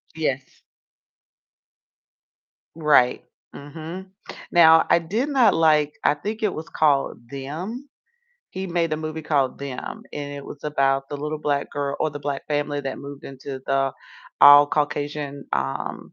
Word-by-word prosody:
Yes. 135 -4 -3 2.1
Right. 150 -6 +3 0.3
Mhm. 160 +6 -8 0.4
Now, 160 -2 +7
I - - +5
did 215 - -2
not 265 -4 +4
like, 150 -2 +3
I - - +4
think 215 +9 -5
it 205 - +1
was 160 +1 -7
called 145 -3 +1
Them? 175 - -6 0.6
He 190 +1 -5
made 170 -2 -1
a - - +1
movie 155 0 -5
called 140 -4 0
Them, 140 -2 -6
and 145 -1 -5
it 140 - -8
was 145 - -10
about 135 -2 +1
the 145 - -5
little 150 +1 -4
Black 145 -2 -1
girl 140 -1 -3
or 155 - +1
the 145 - -7
Black 140 -1 -4
family 145 -1 -1
that 135 -1 -5
moved 140 0 -10
into 135 0 -8
the 135 -1 +1 0.5
all 145 0 +9
Caucasian, 145 -1 -2
um, 65 0 -3
145 Hz, 145 wpm, -23 LUFS, 140-160 Hz, 2.1 s, all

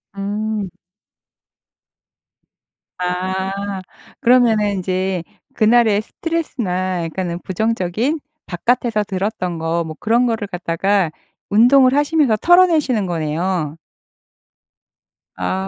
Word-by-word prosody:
음. 205 0 -3 2.3
아 185 +1 -2 0.7
그러면은 235 -4 +4
인제 185 -1 -2 0.3
그날의 220 -2 +4
스트레스나 190 - -2
약간은 170 +1 -3
부정적인 220 - -1 0.3
바깥에서 225 +3 0
들었던 190 -3 -3
거 165 +1 -1
뭐 160 -1 -7
그런 235 +3 +2
거를 225 -3 -1
갖다가 180 0 0 0.4
운동을 255 +5 +5
하시면서 290 -5 +3
털어내시는 320 - +4
거네요. 165 -1 -2 1.6
아. 190 - -2
200 Hz, 210 characters per minute, -19 LUFS, 180-235 Hz, 2.3 s, 운동을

